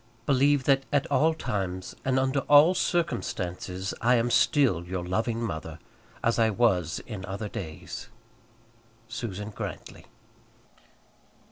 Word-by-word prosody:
Believe 140 0 +3
that 135 0 +3
at 145 +1 +2
all 160 +1 +3
times, 95 - -3
and 130 0 +1
under 130 +1 +1
all 145 +5 +8
circumstances, 95 - -2
I 125 +2 +4
am 120 0 +1
still 130 - +3
your 90 0 -4
loving 110 +5 -1
mother, 80 -9 -5 0.5
as 115 +1 +2
I 110 -1 +4
was 95 -7 +1
in 105 -5 -7
other 100 +2 -4
days. 80 -6 -7 1.0
SUSAN 105 -3 -5
GRANTLY. - - -7
115 Hz, 120 wpm, -27 LUFS, 95-135 Hz, 1.0 s, all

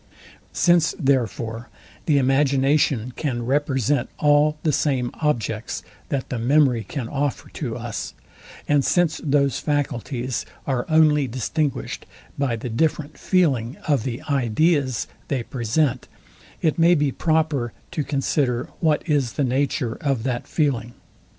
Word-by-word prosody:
Since, 175 -2 +3
therefore, 120 - -1 0.4
the 150 -3 +4
imagination 135 -2 +2
can 120 -6 -2
represent 135 -1 +1
all 150 +1 +3
the 155 - +2
same 130 -4 0
objects 115 -7 -1 0.3
that 135 -2 -2
the 125 - -3
memory 125 -1 +3
can 120 +4 -5
offer 145 +1 -2
to - - -4
us, - - -5 0.5
and 145 -1 +3
since 175 -1 +1
those 140 -3 +2
faculties 130 -4 -2 0.2
are 130 -3 -1
only 155 -3 +4
distinguished 130 +5 -2 0.3
by 135 -4 0
the 115 +2 -5
different 150 +5 -1
feeling 140 - +1
of 145 -5 +3
the 120 0 -4
ideas 135 0 +1 0.2
they 130 -4 -1
present, 125 +2 -1 0.6
it 160 0 +1
may 170 +2 +6
be 145 -3 +1
proper 155 -6 0 0.2
to 150 - -1
consider 135 -3 0
what 160 -1 +1
is 140 -6 +1
the 145 - 0
nature 130 -2 0
of 135 -6 0
that 125 -2 -2
feeling. 120 -7 -1
140 Hz, 130 wpm, -23 LUFS, 125-150 Hz, 0.6 s, may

